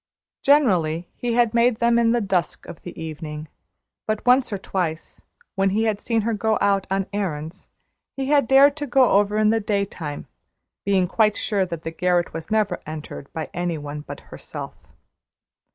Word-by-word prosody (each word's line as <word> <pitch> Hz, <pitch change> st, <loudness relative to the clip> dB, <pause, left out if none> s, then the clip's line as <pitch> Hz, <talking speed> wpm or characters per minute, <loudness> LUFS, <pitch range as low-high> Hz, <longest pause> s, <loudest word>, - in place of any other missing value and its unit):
Generally 180 Hz, -, +3 dB
he 240 Hz, -1 st, -2 dB
had 235 Hz, -1 st, +3 dB
made 235 Hz, 0 st, +3 dB
them 235 Hz, 0 st, +3 dB
in 230 Hz, -1 st, +3 dB
the 235 Hz, 0 st, +2 dB
dusk 190 Hz, -4 st, -1 dB
of 160 Hz, -, -10 dB
the 175 Hz, -, -9 dB
evening; 155 Hz, -1 st, -6 dB, 0.6 s
but 215 Hz, -1 st, -2 dB
once 250 Hz, 0 st, +4 dB
or 200 Hz, -, -1 dB
twice, 175 Hz, -4 st, -4 dB, 0.3 s
when 195 Hz, 0 st, +2 dB
he 210 Hz, +4 st, +1 dB
had 215 Hz, -2 st, 0 dB
seen 230 Hz, -2 st, 0 dB
her 230 Hz, +2 st, -1 dB
go 220 Hz, +1 st, +1 dB
out 195 Hz, -1 st, +2 dB
on 195 Hz, 0 st, 0 dB
errands, 175 Hz, -3 st, -4 dB, 0.5 s
he 270 Hz, -, -1 dB
had 280 Hz, -2 st, +3 dB
dared 275 Hz, +2 st, +6 dB
to 295 Hz, -1 st, -3 dB
go 255 Hz, -2 st, +4 dB
over 205 Hz, +1 st, +3 dB
in 215 Hz, 0 st, +4 dB
the 225 Hz, -, +2 dB
daytime, 200 Hz, -8 st, -3 dB, 0.6 s
being 190 Hz, -2 st, +2 dB
quite 210 Hz, +2 st, +2 dB
sure 195 Hz, -3 st, 0 dB
that 170 Hz, -2 st, -6 dB
the 160 Hz, -, -4 dB
garret 175 Hz, 0 st, 0 dB
was 165 Hz, 0 st, -6 dB
never 215 Hz, -4 st, 0 dB
entered 155 Hz, -2 st, -7 dB
by 160 Hz, -, -5 dB
any 175 Hz, -2 st, -2 dB
one 150 Hz, 0 st, -6 dB
but -, -, -9 dB
herself. -, -, -7 dB
200 Hz, 180 wpm, -23 LUFS, 170-230 Hz, 0.6 s, dared